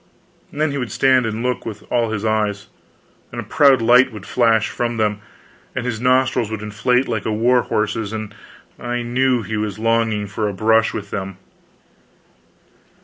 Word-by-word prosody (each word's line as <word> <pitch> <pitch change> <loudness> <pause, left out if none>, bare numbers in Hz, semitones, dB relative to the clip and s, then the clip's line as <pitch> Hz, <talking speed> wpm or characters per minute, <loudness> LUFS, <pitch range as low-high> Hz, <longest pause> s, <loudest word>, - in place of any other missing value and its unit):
Then 150 0 -1
he 140 - -3
would 125 -3 -4
stand 130 -3 +3
and 110 +1 -3
look 125 -1 -1
with 105 -2 -7
all 120 -2 +1
his 110 -1 -3
eyes; 105 -2 -1 0.6
and - - -6
a - - -4
proud 135 -5 +4
light 125 +3 +5
would 105 -3 -10
flash 115 -3 +2
from 120 -1 -3
them, 105 -1 0 0.5
and 130 -1 -3
his 115 -2 -3
nostrils 130 -2 +2
would 110 -1 -5
inflate 125 +5 0
like 110 -4 -2
a - - 0
war 120 +3 +3
horse's, 105 -1 -2
and 110 -1 -5 0.5
I 120 0 -3
knew 125 0 +1
he 110 0 -4
was 105 -1 -3
longing 115 -2 +1
for 105 +1 -3
a - - -5
brush 110 +3 +3
with 105 -2 -6
them. 95 -2 -5
115 Hz, 175 wpm, -20 LUFS, 105-125 Hz, 0.6 s, light